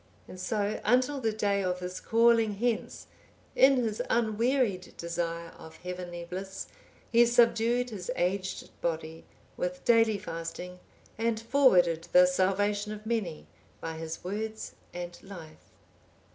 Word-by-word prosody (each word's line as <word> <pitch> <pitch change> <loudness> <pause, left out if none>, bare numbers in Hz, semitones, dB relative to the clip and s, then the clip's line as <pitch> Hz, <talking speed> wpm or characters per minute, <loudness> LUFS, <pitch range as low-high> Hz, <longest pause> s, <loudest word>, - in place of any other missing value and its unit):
And 185 - -10
so, 210 +1 -1
until 255 +5 +2
the 225 -2 +1
day 200 -2 0
of 180 -1 -1
his 180 0 -5
calling 230 -1 +3
hence, 230 +2 -2 0.5
in 270 +1 +6
his 225 -4 -1
unwearied 230 -3 +1
desire 170 0 -3
of 160 - -11
heavenly 180 -1 -6
bliss, 190 +2 -6 0.4
he 235 0 +7
subdued 240 +1 +3
his 205 0 -7
aged 185 +1 -2
body 160 -1 -3 0.3
with 180 0 -3
daily 225 -2 +4
fasting, 170 +1 -6 0.4
and 225 -1 +1
forwarded 185 - +3
the 180 0 +8
salvation 205 +3 +1
of 215 0 -8
many 215 -9 -2 0.3
by 165 - -5
his 160 0 -6
words 215 +4 -4 0.2
and 175 0 -7
life. 170 -6 -12
200 Hz, 130 wpm, -29 LUFS, 175-230 Hz, 0.5 s, the